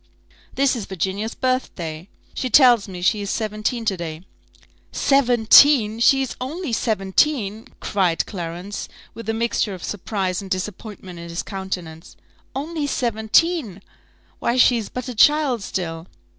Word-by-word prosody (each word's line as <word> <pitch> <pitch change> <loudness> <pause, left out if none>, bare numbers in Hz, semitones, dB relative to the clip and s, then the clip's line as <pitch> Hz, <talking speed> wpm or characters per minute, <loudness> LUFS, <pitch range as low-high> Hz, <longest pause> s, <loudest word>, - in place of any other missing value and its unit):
"This 275 -1 +2
is 225 -5 -4
Virginia's 195 +4 -3
birthday 180 -10 -3 0.2
she 255 - -3
tells 245 -6 +6
me 180 -2 -7
she 210 +3 +2
is 200 - -4
seventeen 215 +2 -2
to 205 -3 +1
day." 165 -1 -6 0.7
"Seventeen! 245 -2 +5
is - - +2
she 270 +1 +4
only 295 +1 -4
seventeen?" 215 +1 0
cried 185 -5 0
Clarence, 180 +2 -6 0.2
with 230 -1 -8
a - - +1
mixture 225 -3 -1
of 180 - -11
surprise 190 -2 -3
and 195 - -9
disappointment 185 -1 -5
in 170 0 -9
his 170 +1 -4
countenance 180 -4 -6 0.4
"Only 300 +2 -3
seventeen! 235 - +1 0.6
Why 235 - 0
she 245 -1 +5
is 220 -3 -5
but 250 0 -6
a 250 - -4
child 280 0 +4
still." 165 -3 -4
215 Hz, 140 wpm, -22 LUFS, 185-250 Hz, 0.7 s, tells